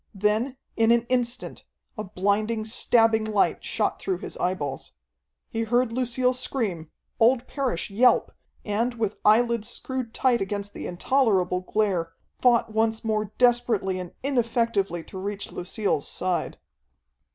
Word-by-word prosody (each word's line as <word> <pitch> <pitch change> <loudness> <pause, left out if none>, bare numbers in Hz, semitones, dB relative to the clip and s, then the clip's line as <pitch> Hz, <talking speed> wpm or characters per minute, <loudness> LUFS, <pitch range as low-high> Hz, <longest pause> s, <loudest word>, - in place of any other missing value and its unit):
Then, 215 +6 0 0.2
in 225 0 +3
an 235 0 +4
instant, 245 -1 -2 0.3
a 215 - -4
blinding, 215 +3 0
stabbing 225 0 +3
light 215 -2 +1
shot - - -1
through 380 -2 -1
his - - -7
eyeballs. 165 -7 -3 0.5
He 225 - -3
heard 240 +1 +1
Lucille 250 +1 +1
scream, 220 - -3 0.3
old 240 +2 +4
Parrish 255 - -3
yelp, 245 +5 +4 0.3
and, 230 +4 0
with 220 -3 -2
eyelids 230 +1 +3
screwed 260 -3 -3
tight 245 -1 +2
against 205 +1 -3
the - - -6
intolerable 185 -2 +1
glare, 185 -4 -1 0.3
fought 235 -3 +3
once 220 0 +1
more 215 -1 0
desperately 240 -6 +2
and 180 -1 -7
ineffectively 230 -9 0
to 190 - -9
reach 200 +1 -5
Lucille's 180 -4 -2
side. 185 -1 -2
220 Hz, 130 wpm, -25 LUFS, 195-240 Hz, 0.5 s, an